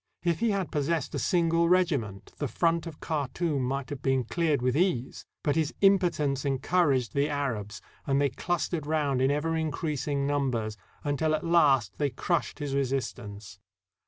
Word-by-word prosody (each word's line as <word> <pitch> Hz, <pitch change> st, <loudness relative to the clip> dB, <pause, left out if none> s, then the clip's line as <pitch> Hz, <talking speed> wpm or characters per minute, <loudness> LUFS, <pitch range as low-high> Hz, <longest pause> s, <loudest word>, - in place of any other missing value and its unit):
If 170 Hz, -2 st, +1 dB
he 230 Hz, 0 st, +2 dB
had 195 Hz, -4 st, -1 dB
possessed 150 Hz, 0 st, -1 dB
a -, -, -1 dB
single 170 Hz, -2 st, +2 dB
regiment, 145 Hz, -, 0 dB
the 145 Hz, -, -1 dB
front 165 Hz, +7 st, +1 dB
of 160 Hz, -3 st, -9 dB
Khartoum 150 Hz, 0 st, -1 dB
might 135 Hz, +3 st, -2 dB
have 140 Hz, -3 st, -5 dB
been 135 Hz, -1 st, +1 dB
cleared 155 Hz, +4 st, 0 dB
with 125 Hz, +1 st, 0 dB
ease; 150 Hz, -7 st, 0 dB, 0.2 s
but 145 Hz, -, +1 dB
his 160 Hz, -1 st, 0 dB
impotence 175 Hz, -9 st, +3 dB
encouraged 140 Hz, -2 st, +1 dB
the 140 Hz, +1 st, +1 dB
Arabs, 120 Hz, -7 st, -3 dB, 0.2 s
and 140 Hz, 0 st, +2 dB
they 140 Hz, -1 st, +3 dB
clustered 175 Hz, -3 st, -2 dB
round 145 Hz, -4 st, +1 dB
in 130 Hz, -, +3 dB
ever 150 Hz, +3 st, 0 dB
increasing 150 Hz, -3 st, -1 dB
numbers, 130 Hz, -7 st, -1 dB, 0.3 s
until 155 Hz, +2 st, +1 dB
at 155 Hz, -, -4 dB
last 135 Hz, -, +3 dB
they 145 Hz, -1 st, +2 dB
crushed 170 Hz, +5 st, -1 dB
his 145 Hz, -2 st, -4 dB
resistance. 120 Hz, -7 st, -3 dB
145 Hz, 160 wpm, -28 LUFS, 135-165 Hz, 0.3 s, impotence